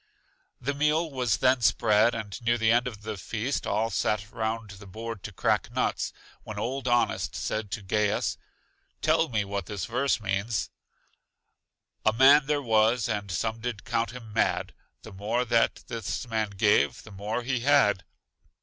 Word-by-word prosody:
The 140 +4 -2
meal 150 +3 +1
was 125 -6 0
then 130 -1 +3
spread, 110 0 +4
and 105 -3 -6
near 120 0 +2
the 110 -1 +3
end 120 +1 +3
of 110 -4 -8
the 110 -1 -4
feast 115 +7 -3
all 110 +3 0
sat 105 +1 -1
round 110 -2 -3
the 100 0 -12
board 115 +2 -6
to - - -7
crack - - 0
nuts, - - -1 0.3
when - - -8
old 130 +1 -3
Honest 120 0 +1
said 110 -1 -3
to 105 +1 -5
Gaius, 105 +2 0 0.7
Tell - - +3
me 110 -4 0
what 100 -2 -4
this 100 -3 -4
verse 125 +2 0
means: 105 +2 -2 1.3
A 110 - +3
man 135 +4 +6
there 145 -1 0
was, 110 0 +3
and 100 -1 -3
some 110 +5 -2
did 115 -3 -5
count 115 0 0
him 115 -4 -10
mad; 110 - 0 0.3
The - - -10
more 110 +6 -1
that 115 -1 +2
this 115 +2 -4
man 110 -2 -1
gave 100 +1 +2
the 110 - -13
more 105 +5 -3
he 130 0 -1
had. 120 -8 +3
115 Hz, 165 wpm, -27 LUFS, 105-120 Hz, 1.3 s, man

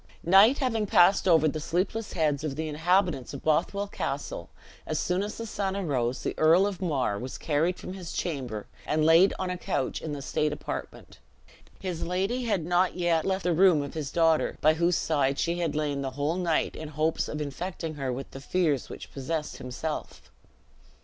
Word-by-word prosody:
Night 195 - +7
having 225 -6 0
passed 190 +1 +5
over 160 -3 +5
the 155 +1 -2
sleepless 185 +7 -2
heads 150 -3 0
of 150 -3 -3
the 160 +2 -3
inhabitants 165 -2 +1
of 135 - -8
Bothwell 175 +6 +1
Castle, - - -4 0.4
as - - -1
soon 180 +1 0
as 205 +1 -4
the 230 - -5
sun 200 -3 -2
arose, 130 -9 -1
the - - -1
Earl 165 +5 +5
of 200 -2 -3
Mar 135 - 0
was 130 +1 -6
carried 165 +4 0
from 180 - -7
his 185 -3 -7
chamber, 130 - -3 0.2
and 155 0 +1
laid 165 +4 +6
on 185 -1 -2
a 180 - -4
couch 130 - -2
in 155 - -5
the 140 -1 -5
state 150 +2 0
apartment. - - -7 0.6
His 180 -4 -4
lady 195 +8 -1
had 195 -8 0
not 180 +2 +2
yet 170 -2 +1
left 190 0 0
the 175 0 +2
room 170 -3 +5
of 140 - -7
his 150 -3 -4
daughter, 165 -1 +2
by 155 +1 +5
whose 170 +2 +2
side 140 -3 +1
she 170 +1 0
had 165 -4 -1
lain 145 -2 -1
the 135 - -2
whole 145 +4 0
night 170 -4 0
in 155 - -6
hopes 155 +2 0
of 150 - -4
infecting 160 +3 -4
her 135 -3 -3
with 130 +2 -6
the 135 - -9
fears 155 -4 0
which - - -9
possessed 150 +3 -3
himself. 130 +5 -6
165 Hz, 195 wpm, -27 LUFS, 150-185 Hz, 0.6 s, Night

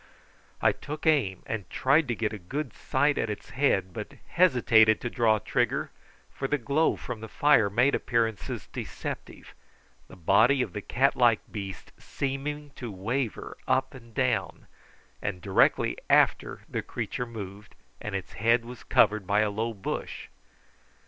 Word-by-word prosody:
I - - +6
took 150 +1 -7
aim, 135 - +2
and 110 -4 -5
tried 140 +3 +3
to 120 - -1
get 110 -1 -2
a 105 - -6
good 135 - -4
sight 145 +2 +1
at 110 - -1
its 105 - -6
head, 100 -9 +1
but - - -6 0.2
hesitated 120 -10 +5
to 120 - -4
draw 115 -3 +3
trigger, 105 - -1 0.4
for 135 - -3
the 150 - +1
glow 140 +6 +1
from 120 -3 -7
the 110 - -6
fire 145 -6 +4
made 125 +7 +3
appearances 115 -3 -1
deceptive, - - -7 0.5
the - - -13
body 110 - +4
of 100 -8 -7
the 105 - -4
cat 135 +7 +1
like 120 -3 +4
beast 100 -4 -7
seeming 145 +2 -4
to 120 -4 -7
waver 115 +6 -3
up 130 0 +1
and 115 -4 -14
down; 65 - 0 0.6
and 100 -3 -3
directly 95 +1 +2
after - - +3
the - - -3
creature 125 - -4
moved, 105 -3 -9 0.3
and 105 -2 -4
its 95 -1 -5
head 115 +2 +2
was 125 0 -10
covered 105 -2 +3
by 105 +1 +3
a 105 -1 +1
low 110 +3 -2
bush. 100 -4 -5
115 Hz, 155 wpm, -27 LUFS, 105-135 Hz, 0.6 s, I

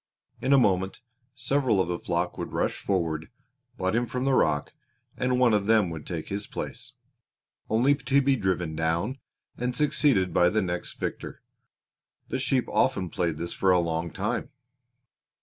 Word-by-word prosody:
In 130 - 0
a 140 - +7
moment 95 -6 +2 0.4
several 130 -4 +1
of 95 - +2
the 85 -1 -2
flock 85 +1 -1
would - - -6
rush - - 0
forward, 80 -5 -1 0.5
butt 95 +2 0
him 120 +1 +1
from 125 +2 -3
the 135 - +2
rock, 75 - +1 0.4
and 125 0 0
one 125 -3 +5
of 105 -1 +1
them 110 -5 +4
would 80 -2 -7
take 85 -4 -5
his 100 +1 -3
place, - - -6 0.8
only 120 +6 +4
to 140 0 +2
be 140 0 +3
driven 90 -7 -1
down 85 - -1 0.4
and 125 +1 -1
succeeded 140 -9 +2
by 90 - +5
the 110 - +1
next 90 -1 -3
victor. - - -5 0.9
The 130 - -2
sheep 130 -1 +1
often 95 -9 +1
played 85 -3 -1
this 85 +2 -4
for 95 - +1
a 90 - +6
long 85 0 -1
time. 120 - -3
100 Hz, 165 wpm, -27 LUFS, 85-125 Hz, 0.9 s, a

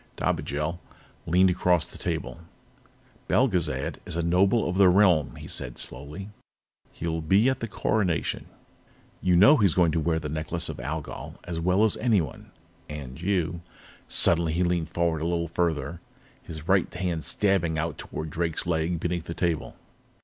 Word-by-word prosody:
Dobigel 75 +4 -2 0.5
leaned 90 +2 +4
across 90 -3 +2
the - - -9
table. - - -4 0.9
"Belgezad 100 - +1
is - - -7
a 85 - -1
Noble 95 +6 +3
of 90 - -2
the 95 -2 +6
Realm," 90 -6 +3
he - - -9
said - - -4
slowly. 75 +10 -6 0.6
"He'll 80 0 -3
be 95 +9 +3
at 130 - +1
the 115 - -3
Coronation. 95 -7 -1 0.7
You 90 -1 +3
know 120 - +7
he's 100 -8 +3
going 85 -3 +4
to 80 - 0
wear 80 +1 0
the 75 - -4
Necklace 80 +3 -3
of - - -6
Algol - - -6
as 85 -2 -4
well 90 +5 +2
as 110 - +3
anyone, 100 - 0 0.4
and 70 -1 -8
you 90 -3 -1 0.2
" - - -23
Suddenly, 85 -2 +5
he 90 +2 +1
leaned 85 -2 0
forward 85 -2 0
a - - -1
little 85 -1 -1
farther, 85 -1 -1 0.4
his 80 -1 -9
right 95 -2 +2
hand 90 -3 -2
stabbing 95 -6 +1
out 80 +2 -3
toward 80 0 -6
Drake's 80 0 -1
leg 85 0 0
beneath 85 0 -2
the 85 - -6
table. 80 -7 -2
85 Hz, 165 wpm, -26 LUFS, 80-90 Hz, 0.9 s, know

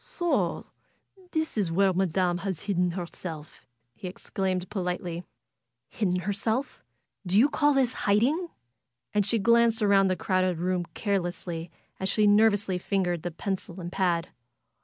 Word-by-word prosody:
^^So 345 -2 -1 0.7
this 315 -8 -1
is 185 -5 0
where 190 +2 +3
Madam 180 -1 +1
has 190 -3 -3
hidden 180 -3 +1
herself 165 -3 -7
!" 120 +1 -49
he 120 - -8
ex 180 - -11
claimed, 185 -1 -1
politely. 180 -2 -3 0.7
Hidden 180 -4 0
herself! 220 +7 -2 0.4
Do 185 +1 +1
you 245 +6 +7
call 295 -1 +2
this 255 -2 +2 0.2
hiding?" 270 - +3 0.7
And 205 -1 +2
she 230 - +2
glanced 235 +1 +3
around 200 -1 +5
the 185 - +1
crowded 185 -2 0
room 180 +1 -1
carelessly 175 -4 -2 0.3
as 190 - 0
she 210 +2 +3
nervously 205 -2 +4
fingered 180 -3 -1
the 175 - -3
pencil 180 +1 -4
and 175 -1 -6
pad. 175 -3 0
190 Hz, 145 wpm, -27 LUFS, 175-210 Hz, 0.7 s, you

